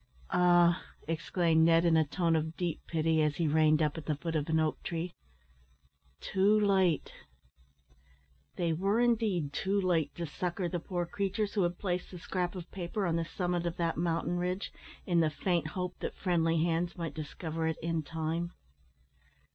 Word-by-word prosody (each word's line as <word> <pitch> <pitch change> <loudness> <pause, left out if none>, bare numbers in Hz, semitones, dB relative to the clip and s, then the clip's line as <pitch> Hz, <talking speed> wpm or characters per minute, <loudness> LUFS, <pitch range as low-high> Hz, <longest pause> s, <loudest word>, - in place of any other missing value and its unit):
"Ah!" 175 0 +4 0.2
exclaimed 165 0 +2
Ned, 165 +1 +5
in 165 -1 +4
a 160 - +5
tone 165 +2 +1
of 160 +1 -2
deep 175 -3 -2
pity, 160 -1 +2
as 150 -1 +1
he 165 - 0
reined 155 +1 +4
up 150 +1 -1
at 150 - -12
the 155 - +1
foot 165 +3 -4
of 150 0 -1
an 160 0 +3
oak 155 -1 0
tree, 170 +1 -4 1.1
"too 200 +3 +3
late!" 190 -6 +2 1.4
They 170 -2 0
were 195 +7 +1
indeed 215 -11 +1
too 200 +1 0
late 175 -5 +1
to 170 - -3
succour 175 +3 -3
the 175 0 -2
poor 175 0 -3
creatures 200 +3 -2
who 205 - +1
had 175 -1 0
placed 180 -2 -2
the 180 - -9
scrap 180 +1 -2
of 175 -2 -8
paper 195 +2 -3
on 170 -2 +1
the 165 0 0
summit 175 0 -1
of 170 +1 -4
that 165 -1 0
mountain 170 +1 0
ridge, 180 +2 -2 0.3
in 175 -2 +2
the 160 -2 +3
faint 170 +1 0
hope 180 +3 -4
that - - -4
friendly 165 -3 +2
hands 170 +1 0
might 165 -2 -4
discover 160 +1 -4
it 160 - -1
in 165 -1 0
time. 165 +3 -3
170 Hz, 180 wpm, -31 LUFS, 160-180 Hz, 1.4 s, Ned